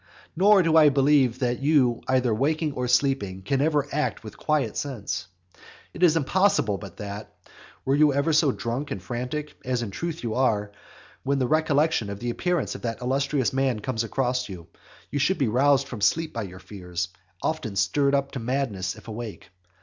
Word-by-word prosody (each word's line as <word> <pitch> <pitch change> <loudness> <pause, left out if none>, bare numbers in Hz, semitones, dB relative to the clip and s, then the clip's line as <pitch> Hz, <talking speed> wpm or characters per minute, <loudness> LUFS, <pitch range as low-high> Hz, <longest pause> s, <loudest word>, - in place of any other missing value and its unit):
Nor 195 +2 +5
do 165 -1 +2
I 155 -2 +8
believe 135 -3 +3
that 125 -2 -1
you 135 -5 +3
either 130 -3 +2
waking 150 +5 0
or 125 -1 -2
sleeping, 125 -7 +1
can 135 +7 0
ever 145 -2 +2
act 150 -4 -1
with 110 - -9
quiet 145 -8 0
sense. 105 - -4 0.7
It - - -9
is 165 -3 +5
impossible 165 - +2
but 100 -4 -10
that, 100 0 -7 0.5
were 135 - +2
you 150 +1 +5
ever 140 +4 +1
so 150 -2 +4
drunk 125 +4 -4
and - - -4
frantic, 125 +10 -5
as 125 -1 -1
in 105 - -5
truth 165 - -4
you 115 -2 -2
are, 105 -5 +1 0.5
when 140 +1 0
the 130 - +1
recollection 150 -5 +2
of 100 0 -6
the 120 +1 -2
appearance 175 +3 -1
of - - -8
that 115 -1 -3
illustrious 135 +1 0
man 130 -4 +1
comes 115 0 -2
across 125 +1 -1
you, 90 -4 -8 0.5
you 145 - -1
should 165 +8 +2
be 135 - +1
roused 135 +4 +3
from 120 -6 -7
sleep 155 +10 +1
by 115 - -3
your 90 -3 -7
fears, 90 -3 -5
and 90 - -31 0.2
often 135 -10 -2
stirred 140 +10 +2
up 140 0 -1
to 135 - -5
madness 115 -7 -2
if - - -15
awake. 110 -5 -7
130 Hz, 190 wpm, -25 LUFS, 110-145 Hz, 0.7 s, I